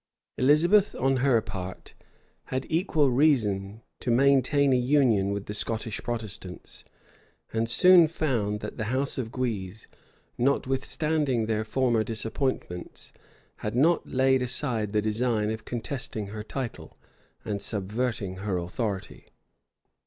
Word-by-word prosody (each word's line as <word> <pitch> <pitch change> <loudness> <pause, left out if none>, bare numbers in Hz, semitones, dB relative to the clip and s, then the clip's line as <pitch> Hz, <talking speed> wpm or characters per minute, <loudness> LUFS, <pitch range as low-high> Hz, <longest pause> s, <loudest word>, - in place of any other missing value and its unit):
Elizabeth, 170 +10 +4
on 135 0 +1
her 130 -2 +3
part, 95 -4 -7 0.5
had 130 +1 -3
equal 160 -5 +2
reason 110 -7 +1 0.2
to - - -4
maintain 140 +2 +4
a - - +4
union 125 -6 +3
with 100 0 -3
the 105 - -5
Scottish 110 0 -3
Protestants; 110 -6 -6 0.7
and 115 0 0
soon 175 +6 +7
found 120 -10 -1
that - - -6
the 110 - -2
house 130 +4 -1
of 115 -3 -4
Guise, 110 -6 -4 0.5
notwithstanding 135 0 0
their 110 0 0
former 120 -1 +1
disappointments, 110 -5 -4 0.4
had 105 +2 -4
not 160 +7 +3
laid 130 0 +3
aside 120 -4 -1
the 105 0 +1
design 110 0 0
of 110 0 -6
contesting 120 -4 -4
her 105 +1 -6
title, 125 +1 -6 0.5
and 100 -2 -3
subverting 105 -1 -3
her 95 -1 -2
authority. 95 +3 -4
120 Hz, 125 wpm, -27 LUFS, 105-135 Hz, 0.7 s, soon